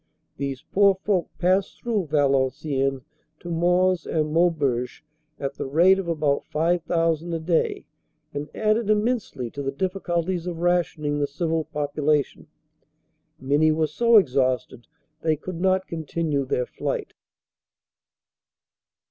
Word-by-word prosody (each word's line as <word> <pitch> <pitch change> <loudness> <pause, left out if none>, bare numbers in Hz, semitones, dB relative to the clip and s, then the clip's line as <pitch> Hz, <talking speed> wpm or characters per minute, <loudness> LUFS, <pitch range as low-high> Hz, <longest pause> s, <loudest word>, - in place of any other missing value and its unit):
These 135 -2 -4
poor 200 -1 +5
folk 190 -2 -1
passed 185 +2 +1
through 215 -7 -1
Valenciennes 135 -1 +1 0.4
to 175 - -7
Mons 180 +1 +2
and 155 -1 -1
Mau 175 +2 +5
beuge 130 -7 -2 0.4
at 140 0 -3
the - - -5
rate 175 +7 +5
of 190 - -4
about 150 -4 0
5,000 165 0 0
a - - -2
day 160 +1 0 0.5
and 145 +1 -4
added 215 0 +1
immensely 215 - 0
to 140 - -6
the 135 -1 -2
difficulties 180 +1 -2
of 175 -2 -4
rationing 165 -4 0
the 145 - +1
civil 160 +2 -1
population. 150 -1 -1 0.9
Many 145 +4 +3
were 155 0 +1
so 230 +10 +4
exhausted 130 - +1 0.3
they 160 -1 +2
could 170 +3 -7
not 190 0 +2
continue 160 -3 -2
their 125 -1 -1
flight. - - -4
160 Hz, 125 wpm, -24 LUFS, 145-180 Hz, 0.9 s, poor